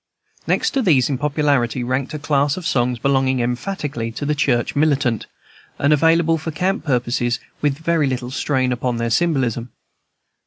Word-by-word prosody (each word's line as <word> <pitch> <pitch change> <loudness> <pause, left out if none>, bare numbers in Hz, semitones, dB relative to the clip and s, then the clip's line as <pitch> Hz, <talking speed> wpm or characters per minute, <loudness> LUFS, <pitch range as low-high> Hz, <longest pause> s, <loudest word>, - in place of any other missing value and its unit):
Next - - +1
to 270 - 0
these 150 - +3
in 130 - -2
popularity 140 -4 +1
ranked 130 +3 -2
a - - -2
class 145 0 +1
of 180 - -6
songs 125 -5 +1
belonging 130 +1 +1
emphatically 125 -1 -3
to 145 - -4
the 150 - +1
Church 130 -5 0
Militant, 140 -6 +1 0.5
and 140 +2 +3
available 165 +2 +3
for 160 - -5
camp 180 +2 -1
purposes 120 -3 0 0.2
with 145 -2 +1
very 160 -2 +1
little 125 -1 -3
strain 130 -2 0
upon 125 -1 -1
their 115 0 -2
symbolism. 125 -6 0
140 Hz, 160 wpm, -20 LUFS, 125-150 Hz, 0.5 s, these